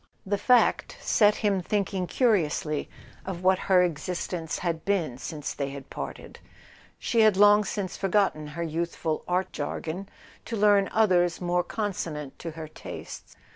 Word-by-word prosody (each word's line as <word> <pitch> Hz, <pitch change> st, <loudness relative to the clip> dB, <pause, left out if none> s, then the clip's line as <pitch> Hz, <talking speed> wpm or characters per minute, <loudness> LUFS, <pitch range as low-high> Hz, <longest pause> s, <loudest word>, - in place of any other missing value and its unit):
The 200 Hz, +1 st, -1 dB
fact 250 Hz, +3 st, +3 dB
set 210 Hz, -1 st, +4 dB
him 195 Hz, -2 st, +2 dB
thinking 195 Hz, -1 st, -1 dB
curiously 165 Hz, -, +1 dB, 0.3 s
of 185 Hz, -2 st, -6 dB
what 185 Hz, 0 st, +4 dB
her 185 Hz, -1 st, +6 dB
existence 170 Hz, 0 st, -3 dB
had 165 Hz, -3 st, -2 dB
been 165 Hz, -11 st, -1 dB
since 150 Hz, -2 st, -5 dB
they 140 Hz, -1 st, -3 dB
had 140 Hz, -1 st, -9 dB
parted. -, -, -7 dB, 0.6 s
She 230 Hz, -, 0 dB
had 215 Hz, -3 st, +5 dB
long 205 Hz, +1 st, +7 dB
since 195 Hz, -1 st, -4 dB
forgotten 195 Hz, -6 st, +1 dB
her 170 Hz, -, -1 dB
youthful 165 Hz, -1 st, -2 dB
art 185 Hz, +1 st, 0 dB
jargon 160 Hz, +6 st, -4 dB, 0.4 s
to 230 Hz, -, -4 dB
learn 205 Hz, -1 st, +4 dB
others 180 Hz, -5 st, +3 dB
more 180 Hz, 0 st, +1 dB
consonant 165 Hz, -10 st, -4 dB
to 170 Hz, -, -5 dB
her 160 Hz, -1 st, -6 dB
tastes. 155 Hz, -, -9 dB
180 Hz, 145 wpm, -27 LUFS, 160-205 Hz, 0.6 s, long